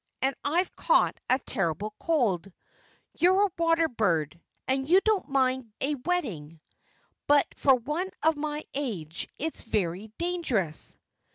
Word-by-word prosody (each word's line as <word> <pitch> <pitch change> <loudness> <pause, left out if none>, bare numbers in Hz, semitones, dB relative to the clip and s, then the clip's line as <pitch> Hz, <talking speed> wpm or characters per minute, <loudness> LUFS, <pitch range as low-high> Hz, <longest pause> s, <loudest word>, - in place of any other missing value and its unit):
And 270 +1 +2
I've 345 +6 0
caught - - +2
a 255 - +5
terrible 205 - -2
cold. 215 - +1 0.7
You're 375 +3 +5
a 395 - -3
water 330 0 +3
bird; 170 - 0 0.3
and 265 +2 0
you 370 +3 +7
don't 430 -3 +1
mind 260 -3 +1
a 290 +2 0
wetting. 235 - -3 0.7
But 290 -1 +5
for 270 -2 +5
one 300 +10 -3
of 320 0 +4
my 300 0 -3
age 190 - -4
it's 320 +3 -3
very 205 -1 -2
dangerous." 285 - -1
270 Hz, 130 wpm, -28 LUFS, 200-330 Hz, 0.7 s, you